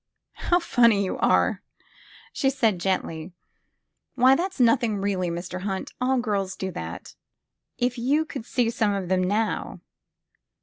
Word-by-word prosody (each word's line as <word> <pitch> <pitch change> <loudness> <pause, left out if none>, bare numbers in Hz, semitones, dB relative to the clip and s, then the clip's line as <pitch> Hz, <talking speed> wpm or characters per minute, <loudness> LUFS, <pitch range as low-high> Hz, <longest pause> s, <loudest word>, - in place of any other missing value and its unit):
How 350 - +5
funny 235 - +3
you - - -4
are! - - +2 0.3
" - - -24
she 270 - +1
said 230 -8 +1
gently. 175 -2 -2 0.8
Why, 260 +1 +6
that 370 +5 -2
's - - -16
nothing, 230 -3 +3
really, 195 -3 -1
Mr. 175 +2 -5
Hunt. 195 -1 -4
All 260 +1 +2
girls 200 -5 -1
do 190 0 -4
that. 85 - -7 0.6
If 245 0 -1
you 285 +6 +1
could 270 -7 -8
see 240 -2 +1
some 210 -3 +1
of 190 -3 -4
them, 185 -1 +2
now!" 210 +4 -1
215 Hz, 155 wpm, -25 LUFS, 190-250 Hz, 0.8 s, Why